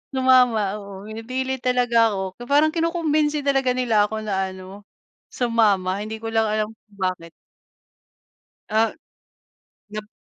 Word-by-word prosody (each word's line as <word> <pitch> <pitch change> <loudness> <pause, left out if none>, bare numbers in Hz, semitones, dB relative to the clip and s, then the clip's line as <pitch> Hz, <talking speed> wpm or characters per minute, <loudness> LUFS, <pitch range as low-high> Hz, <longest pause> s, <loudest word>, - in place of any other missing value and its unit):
Sumama, 245 -6 +3
oo, 200 -1 -10
pinipilit 255 +4 -3
talaga 245 -2 +3
ako. 190 -1 -4
So - - -5
parang 300 +2 +4
kinukumbinsi 310 -3 0
talaga 270 -2 +2
nila 225 -5 +2
ako 220 0 -4
na 190 -2 -1
ano, 190 +2 -11 0.5
sumama 205 -5 +1
hindi 220 +1 -5
ko 225 0 -4
lang 225 -1 +2
alam 215 0 0
kung 210 -2 -27
bakit. 185 -3 -3 1.4
Ah 220 +1 +1 1.0
nap 210 0 -7
220 Hz, 130 wpm, -23 LUFS, 200-255 Hz, 1.4 s, parang